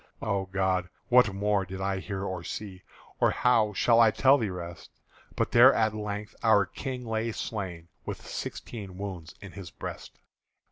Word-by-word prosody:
O 95 -1 -1
God! 95 -1 0 0.2
what 125 -4 +6
more 100 0 +1
did 95 0 -7
I 95 0 -1
hear 95 0 -4
or 95 -3 -4
see, 95 -1 -6 0.4
Or - - +4
how 115 -4 +3
should 115 +3 +4
I 115 -1 +7
tell 135 +5 +4
the 110 -4 -1
rest? 85 -2 -7 0.5
But - - 0
there 125 +3 +8
at 110 -1 +2
length 105 0 -5
our 105 -3 +5
King 125 +5 -6
lay 115 0 -1
slain 90 -8 -5 0.2
With - - -6
sixteen 100 -6 -6
wounds 95 -3 -6
in 100 - -9
his 95 -3 -9
breast. - - -8
100 Hz, 170 wpm, -28 LUFS, 95-110 Hz, 0.5 s, there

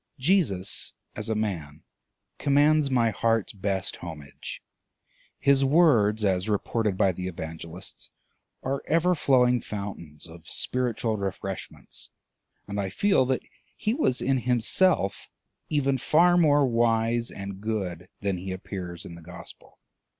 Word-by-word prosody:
Jesus, 130 - +1 0.2
as 110 +1 -3
a 110 - +1
man, 85 -9 -3 0.6
commands 145 +1 +4
my 120 -4 +3
heart's 115 0 0
best 95 -2 -2
homage. 75 -4 -8 0.7
His 140 -1 +3
words, 125 -9 +4
as 95 +1 +1
reported 105 -1 0
by 95 - +4
the 90 +1 -5
Evangelists, 85 0 -7 0.5
are 135 +1 -1
ever 170 +3 +3
flowing 125 -6 +3
fountains 95 -7 -7
of 80 0 -12
spiritual 120 -3 -1
refreshments; 95 -1 -5 0.6
and 100 0 -2
I 95 - -2
feel 195 - +2
that 130 -1 0 0.3
he 215 - 0
was 130 - +1
in 135 0 +2
himself 125 - +2 0.4
even 140 -3 +1
far 175 +7 +4
more 145 -4 +5
wise 115 -1 +1
and 100 -1 -7
good 95 -5 -3
than 100 -2 0
he 95 +2 -5
appears 95 -2 -6
in - - -8
the 85 - -11
gospel. 90 +2 -11
110 Hz, 130 wpm, -27 LUFS, 95-135 Hz, 0.7 s, more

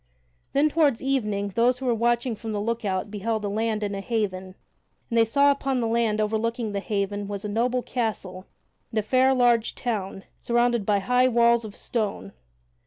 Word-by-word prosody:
Then 285 +2 +4
toward 295 -6 +2
evening 210 -7 -1
those 235 +5 +2
who 265 - -7
were 245 - +2
watching 235 +1 0
from 220 +1 -6
the 205 - -2
lookout 205 -3 -2
beheld 215 +1 -2
a - - -1
land 215 +1 -1
and 200 -1 -2
a 195 - -4
haven, 190 -4 -3 0.6
and - - -1
they - - +7
saw 280 +5 +4
upon 275 -2 -1
the 235 - 0
land 225 -2 +1
overlooking 220 +1 -1
the 200 - -2
haven 205 0 -2
was 205 0 -5
a - - -1
noble 240 +4 0
castle 200 -6 -4 0.4
and 225 - -6
a 215 - +2
fair 260 +4 +3
large 240 -3 +2
town, 195 -5 -3 0.2
surrounded 240 -3 +1
by 205 -1 +3
high 250 +6 +2
walls 235 -1 +3
of 210 -2 -9
stone. 210 -3 -3
225 Hz, 185 wpm, -25 LUFS, 205-240 Hz, 0.6 s, they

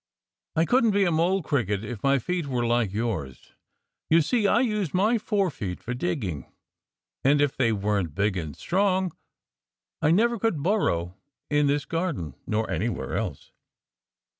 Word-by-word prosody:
"I 160 - +3
couldn't 230 -1 +3
be 200 - +4
a 175 - +2
Mole 175 +4 +2
Cricket 110 - -1
if 110 -1 -6
my 140 0 +3
feet 170 +4 -2
were 125 -3 -1
like 120 -4 +1
yours. 100 - -4 0.6
You 165 0 +5
see, 220 - +1
I 235 - +4
use 210 - -1
my 215 +5 +3
forefeet 180 - -1
for 120 - -5
digging. 120 - -3 0.7
And 145 +2 +4
if 145 -2 +2
they 120 -3 +2
weren't 100 -6 -1
big 100 0 +1
and 80 -5 -5
strong 190 -1 +1 0.9
I 150 - +3
never 230 +7 +3
could 190 -10 0
burrow 95 - 0 0.3
in 145 0 +3
this 145 +1 +1
garden, 165 - -2
nor 110 +1 0
anywhere 95 +3 -2
else." - - -4
140 Hz, 155 wpm, -26 LUFS, -, 0.9 s, You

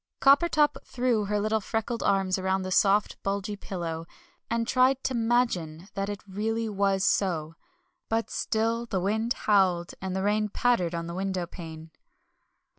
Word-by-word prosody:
Coppertop 295 +2 +4
threw 240 -4 0
her 210 +1 0
little 215 +1 0
freckled 225 +3 -2
arms 195 -1 +1
round 190 0 0
the 185 - -4
soft, 200 +2 +3
bulgy 200 +1 -2
pillow, 165 -4 -5 0.4
and 230 0 0
tried 255 +1 +3
to 260 - -1
"'magine" 225 -8 0
that 195 0 -2
it 205 -1 -5
really 225 +4 -2
was 195 -2 +1
so; 165 -7 +1 0.6
but 225 0 -1
still 230 +2 -1
the 195 -4 -1
wind 220 +5 0
howled, 185 -4 +3
and 190 0 -3
the 190 - -1
rain 210 +1 +1
pattered 200 -7 +1
on 170 0 -3
the 170 - -6
windowpane. 175 -4 -5
200 Hz, 150 wpm, -27 LUFS, 185-225 Hz, 0.6 s, Coppertop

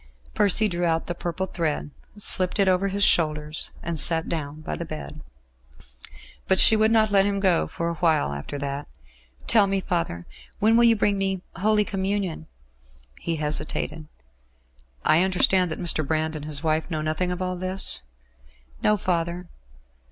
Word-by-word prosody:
Percy 205 - +3
drew 175 -3 -3
out 165 -1 +1
the 175 - -3
purple 175 +2 -3
thread, 160 -5 -3 0.3
slipped 185 -2 +3
it 200 -2 +3
over 185 +1 +2
his 200 +1 -1
shoulders, 155 -3 +1
and 165 -1 -1
sat 165 +1 +2
down 155 -2 -4
by 155 - -4
the - - -5
bed. 155 -1 -8 1.3
But 190 - +3
she 220 - +7
would 220 0 +3
not 220 -1 +3
let 195 -1 +5
him 200 0 -1
go 185 -4 +2
for 170 - -4
a 170 - -1
while 160 - +1
after 70 - -6
that. 140 +1 -4 0.6
"Tell 215 -3 +4
me, 195 0 0
father. 165 - -3 0.3
When 220 +2 +3
will 235 0 +5
you 230 -1 +5
bring 205 -1 +1
me 195 -1 -2
Holy 210 +3 +2
Communion?" 190 -5 -3 0.7
He 170 - -2
hesitated. 155 +1 -3 1.0
"I 155 +2 +5
understand 185 -1 +2
that 155 - -5
Mr. 170 -3 +1
Brand 155 +2 -1
and 150 -1 -6
his 150 0 -3
wife 160 +1 0
know 155 -3 -2
nothing 155 +4 -1
of 180 - -4
all 185 0 -2
this?" 185 +1 0 0.8
"No, 210 - +3
father." 175 -1 -2
175 Hz, 165 wpm, -24 LUFS, 155-195 Hz, 1.3 s, she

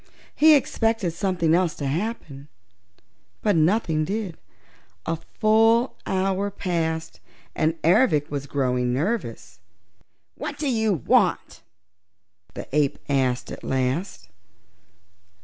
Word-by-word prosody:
He 310 0 +7
expected 225 -8 0
something 170 -2 0
else 175 -2 +2
to 145 - -5
happen, 150 -3 -4 1.0
but 210 -3 +2
nothing 160 -1 +2
did. 195 0 -3 0.7
A 165 - -1 0.2
full 225 +3 +4
hour 195 +1 0
passed 165 -4 -3 0.3
and 160 +1 0
Ervic 160 - +3
was 140 -1 -4
growing 125 -3 0
nervous. 130 - -3 0.7
"What 290 - -6
do 295 - -2
you 220 -4 +1
want?" 165 -10 +1 0.9
the - - -7
ape 145 -2 +2
asked 130 -3 0
at - - -8
last. 130 - -2
170 Hz, 105 wpm, -24 LUFS, 145-215 Hz, 1.0 s, He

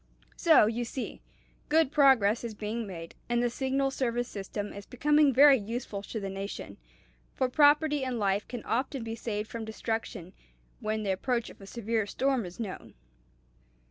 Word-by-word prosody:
So, 320 -9 +6
you 230 +3 -1
see, 245 +2 -6 0.5
good 315 -2 +3
progress 260 -8 +4
is 230 -2 -5
being 215 +2 -4
made; 165 -3 -8 0.2
and 240 0 +2
the 240 - +1
Signal 270 +2 0
Service 245 -2 -1
system 205 +1 -5
is 200 -1 -9
becoming 295 +3 +3
very 275 +1 +7
useful 220 -1 -5
to 220 +2 -5
the 195 - -4
nation, 195 +1 -6 0.6
for 260 - +1
property 295 +1 +4
and 255 -2 -2
life 200 -1 0
can 245 -3 -6
often 260 +1 -1
be 225 0 -4
saved 215 -2 -4
from 230 0 -5
destruction 220 -5 -4 0.5
when 215 0 -2
the 200 - 0
approach 235 +5 -1
of - - -17
a 195 - -11
severe 225 -1 -2
storm 260 -2 0
is 175 - -12
known. 210 -5 -6
230 Hz, 170 wpm, -29 LUFS, 210-265 Hz, 0.6 s, very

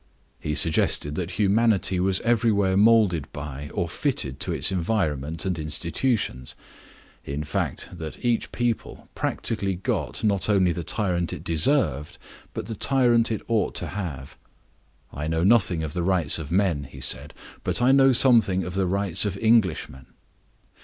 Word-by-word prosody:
He 75 0 -3
suggested 75 -1 +2
that 90 +3 -4
humanity 105 -2 +2
was 95 +1 +1
everywhere 110 -5 +1
molded 105 -7 +3
by 75 -1 -7
or - - -2
fitted 65 0 -3
to - - -2
its - - +2
environment 85 -5 -2
and 90 -3 -2
institutions; 80 - -2 0.7
in 70 +2 -4
fact, 75 +4 -3
that 80 +8 -7
each 120 -2 0
people 120 -2 -3
practically 100 -4 -1
got, 95 - -3
not 100 -2 +1
only 95 -4 +3
the 85 0 -4
tyrant 90 -2 -2
it - - -8
deserved, 80 - +1 0.4
but - - -4
the 115 - -5
tyrant 120 -2 +2
it 110 - -3
ought 115 -2 0
to - - -2
have. 80 -9 -6 0.8
"I 75 +2 -4
know 80 +1 -1
nothing 95 -6 +3
of 75 -1 -5
the 90 - -2
rights 85 -4 +2
of 75 -1 -7
men," 90 -6 +1
he 70 - -12
said, 70 +3 -2 0.3
"but - - 0
I 125 +2 +4
know 135 0 +5
something 115 -7 +4
of 90 +1 -6
the 95 -1 0
rights 100 -1 +1
of 100 -2 -2
Englishmen." 95 - +1
95 Hz, 155 wpm, -24 LUFS, 80-110 Hz, 0.8 s, know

